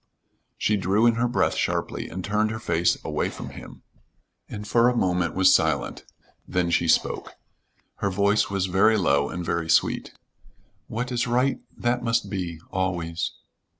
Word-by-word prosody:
She 105 - +1
drew 100 +4 +2
in 120 - +5
her 120 +2 +1
breath 120 - +1
sharply - - -2
and 95 +1 -6
turned 105 +1 +1
her 110 - -4
face 85 -4 +1
away - - -1
from - - -8
him, - - -12 0.7
and 105 0 -7
for 120 +3 +4
a 125 - -1
moment 90 -4 0
was 95 0 +5
silent; 80 -3 0 0.4
then 90 -1 0
she 85 - +2
spoke. - - +1 0.6
Her 100 - -1
voice 100 +2 +2
was 100 -1 0
very 100 +4 +3
low, 70 -7 +2
and 90 -1 -5
very 85 -1 -2
sweet. - - +2 0.8
"What 125 +3 -4
is 125 0 0
right, 125 +3 +1 0.2
that 120 +1 0
must 115 -4 0
be. 90 -5 -4
Always." 85 -3 -2
100 Hz, 160 wpm, -25 LUFS, 90-115 Hz, 0.8 s, in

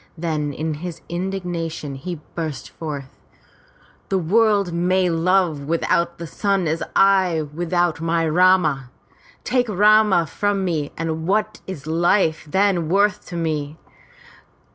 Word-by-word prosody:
Then 155 -3 -2
in 155 +3 -3
his 175 -2 -6
indignation 175 -4 -4
he 155 +4 -6
burst 160 -4 -5
forth: 145 -4 -7 0.9
The 195 - +1
world 200 +1 +2
may 180 +1 +2
live 165 -3 +1
without 170 +1 0
the 170 - -6
sun 195 +2 0
as 160 +2 0
well - - -5
as - - -29
I 190 -4 +4
without 175 0 0
my 165 0 +1
Rama! 160 -6 +3 0.5
Take 245 -2 0
Rama 210 -2 +4
from 200 +5 -1
me 155 -5 -2
and 160 0 -3
what 215 +2 0
is 160 -7 -7
life 165 0 +1
then 190 -2 +1
worth 205 +3 +1
to 175 - -7
me? 155 -3 -2
170 Hz, 135 wpm, -21 LUFS, 160-190 Hz, 0.9 s, I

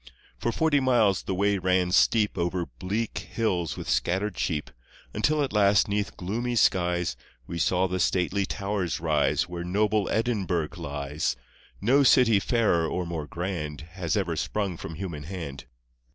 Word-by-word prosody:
For 120 - 0
forty 155 +1 +2
miles 120 -8 +3
the 95 - -3
way 100 +1 +2
ran 90 0 +1
steep 105 +3 +3
Over 85 -1 -1
bleak 95 - -3
hills 90 -8 -2
with - - -6
scattered 95 +2 0
sheep, 75 -4 -2 0.4
Until 150 +8 +1
at 135 - -3
last, 100 -1 +4
'neath 105 0 -2
gloomy 120 +7 -2
skies, 90 - +2 0.3
We 85 +4 -5
saw 90 +2 +2
the 90 0 -2
stately 95 +2 +1
towers 100 -3 -2
rise 75 -3 +1
Where 85 -1 -5
noble 105 +3 +1
Edinburgh 100 -9 0
lies 70 0 -3 0.2
— - - -28
No 140 +3 +6
city 125 -5 +5
fairer 100 -7 +2
or 90 +2 -2
more 80 -3 -4
grand 85 -3 -4
Has 90 0 -2
ever 90 -5 -1
sprung 100 +1 -2
from 80 0 -7
human 80 -4 -6
hand. 80 -6 -6
95 Hz, 155 wpm, -26 LUFS, 85-105 Hz, 0.4 s, No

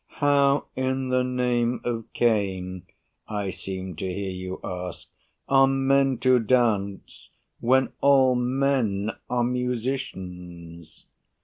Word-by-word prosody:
How 140 -1 +3
in 130 0 -1
the 130 0 +2
name 125 -1 0
of 115 -2 -3
Cain, 95 -5 0 0.4
I 100 -3 -3
seem 95 -2 -6
to 95 - -3
hear 95 +1 -3
you 95 0 -6
ask, 90 -1 -6 0.4
are 135 0 +5
men 135 0 +2
to 130 -1 +5
dance, 110 -5 0 0.3
When 130 +2 +2
all 135 -2 +5
men 125 -5 0 0.2
are 125 -1 +1
musicians. 90 - -5
120 Hz, 110 wpm, -25 LUFS, 95-130 Hz, 0.4 s, are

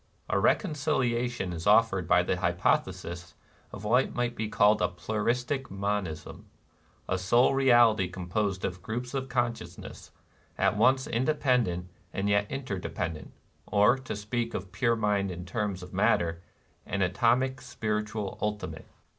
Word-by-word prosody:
A - - +2
reconciliation 125 - 0
is 85 +1 -5
offered 105 -4 +4
by - - +4
the - - -1
hypothesis 85 -2 -1 0.4
of 95 - -9
what 120 +5 +2
might 120 -1 -1
be 110 -1 -3
called 105 0 +4
a - - +3
pluristic 125 +8 -2
monism, 95 -4 -4 0.3
— - - -36 0.3
a 95 - 0
sole 120 +8 +4
reality 120 -7 +5
composed 95 +1 -2
of 90 -1 -4
groups 120 +4 -4
of 135 -1 -3
conscious 120 -2 -2
ness, - - -10 0.5
at - - +2
once 130 +5 +3
independent 125 - +1 0.3
and 100 +1 -1
yet 100 0 +2
interde 130 -9 -4
pendent, 85 -3 -4 0.2
— - - -39
or, 105 +4 +4
to 130 -4 -6
speak 115 +3 -3
of 95 0 -5
pure 115 +4 +1
mind 105 -3 0
in 90 -1 -6
terms 95 0 -3
of 90 - -11
matter, 85 0 +1 0.4
an 100 0 -1
atomic 120 +8 +1
spiritual 105 -5 -3
ultimate. 105 0 -4
105 Hz, 145 wpm, -28 LUFS, 95-125 Hz, 0.5 s, reality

